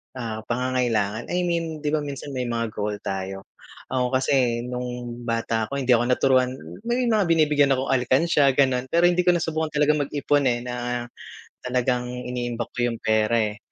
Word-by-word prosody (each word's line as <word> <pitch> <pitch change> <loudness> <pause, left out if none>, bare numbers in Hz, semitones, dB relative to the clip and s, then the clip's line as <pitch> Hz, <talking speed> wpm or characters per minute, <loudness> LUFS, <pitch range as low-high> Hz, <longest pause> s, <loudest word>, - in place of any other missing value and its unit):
ah, 115 -3 -4
pangangailangan, 120 -4 0
I 180 0 -1
mean 165 -3 -2
'di 150 - 0
ba 155 - +2
minsan 145 -1 -6
may 125 -2 -3
mga 115 -2 -2
goal 105 0 -3
tayo. 95 0 -4 0.5
Ako 130 -1 +1
kasi 130 -3 +1
nung 125 0 -4 0.4
bata 115 -1 -1
ako 140 - -5
hindi 130 -2 0
ako 120 0 +4
naturuan 130 0 +3 0.4
may 245 +1 +1
mga 220 -6 +2
binibigyan 150 -4 +3
akong 130 +1 -2
alikansya, 135 +2 +3
gano'n. 130 -2 +2
Pero 170 +6 +2
hindi 180 +1 0
ko 175 - +6
nasubukan 160 -2 -2
talagang 150 +1 +3
mag-ipon 145 -1 +1
eh, 120 -1 0
na 125 0 -3 0.6
talagang 125 0 0 0.2
iniimbak 120 -2 -4
ko - - -13 0.2
yung 115 - -11
pera, 110 +1 +2
eh. 105 -1 -3
125 Hz, 170 wpm, -24 LUFS, 120-145 Hz, 0.6 s, ko